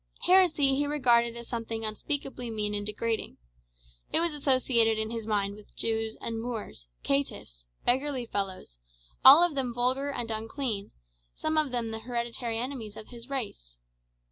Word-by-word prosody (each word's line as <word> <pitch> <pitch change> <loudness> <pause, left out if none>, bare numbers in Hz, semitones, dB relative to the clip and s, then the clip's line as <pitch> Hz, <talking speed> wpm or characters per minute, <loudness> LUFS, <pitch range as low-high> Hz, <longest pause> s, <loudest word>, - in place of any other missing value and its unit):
Heresy 345 -7 +5
he 285 +2 +1
regarded 235 -5 +3
as 235 0 -8
something 225 -1 -3
unspeakably 250 +2 -3
mean 210 -2 -1
and 205 0 -1
degrading. 220 +2 -2 0.7
It - - +4
was 335 -1 +2
associated 255 -6 +3
in 220 0 -1
his 225 -2 -5
mind 200 -2 0
with 210 0 -16
Jews 225 -1 -1
and 225 -1 -3
Moors, 220 - -6 0.2
"caitiffs," - - -2 0.2
"beggarly 260 0 +1
fellows;" 190 - -4 0.4
all 280 +6 +10
of 350 -3 +2
them 265 -3 -1
vulgar 255 +3 0
and 240 -5 -3
unclean, 220 -1 -2 0.5
some 315 - -2
of 310 -2 +3
them 240 -2 -2
the 220 0 -4
hereditary 235 -1 -3
enemies 230 -4 -5
of 220 - -10
his 240 +1 -10
race. 200 - -5
235 Hz, 155 wpm, -29 LUFS, 220-270 Hz, 0.7 s, all